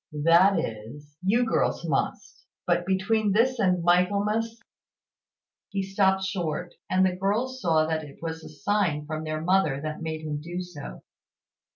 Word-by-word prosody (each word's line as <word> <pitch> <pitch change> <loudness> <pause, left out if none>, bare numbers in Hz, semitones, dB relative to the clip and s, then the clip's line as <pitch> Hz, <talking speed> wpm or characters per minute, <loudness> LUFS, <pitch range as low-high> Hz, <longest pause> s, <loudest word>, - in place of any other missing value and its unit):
That 175 +4 +6
is, 145 +3 -6
you 230 +6 +3
girls 225 - 0
must; - - -2 0.2
but 175 0 +1
between 200 +2 +1
this 245 +4 +2
and 180 -4 +2
Michaelmas 205 +6 +2 0.6
" - - -67
He 195 -1 -2
stopped 190 0 +2
short, 180 -2 -3 0.2
and 185 0 +3
the 185 -1 +1
girls 225 +8 -1
saw 160 -2 +3
that 160 0 -1
it 145 -2 -12
was 160 -1 -5
a - - -9
sign 160 -2 0
from 155 +1 -4
their 155 0 -3
mother 170 -5 +2
that 155 0 -4
made 160 -1 -4
him 150 -1 -4
do 175 +3 -5
so. 170 - -8
180 Hz, 160 wpm, -26 LUFS, 155-195 Hz, 0.6 s, That